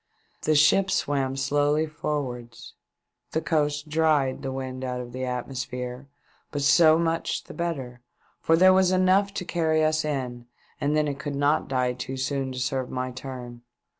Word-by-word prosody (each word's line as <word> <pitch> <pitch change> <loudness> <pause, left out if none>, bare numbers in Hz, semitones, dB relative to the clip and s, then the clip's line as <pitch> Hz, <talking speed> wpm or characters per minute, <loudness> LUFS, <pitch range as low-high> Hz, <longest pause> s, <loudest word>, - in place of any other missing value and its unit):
The 155 - +2
ship 185 +6 +5
swam 135 -6 0
slowly 145 +3 +2
forwards. 130 -6 -5 0.6
The 160 - +1
coast 150 -2 0
dried 150 -4 +2
the 135 - -3
wind 130 -1 -5
out 125 -1 -3
of 120 -1 -7
the 130 +1 -4
atmosphere, 125 0 -5 0.4
but 145 -2 -3
so 155 +2 +6
much 165 0 -1
the - - -11
better, 135 -8 -4 0.4
for 165 - +3
there 185 +2 +7
was 185 -1 +4
enough 185 +2 +3
to 180 - -3
carry 160 -2 +1
us 155 0 +2
in, 125 -5 -4 0.3
and 150 0 +1
then 150 0 +2
it 140 -1 -4
could 145 -2 -4
not 145 +2 +1
die 125 -2 0
too 130 +1 -6
soon 135 0 -2
to 130 - -7
serve 130 0 -2
my 130 0 -3
turn. 125 -2 -8
140 Hz, 165 wpm, -26 LUFS, 130-155 Hz, 0.6 s, there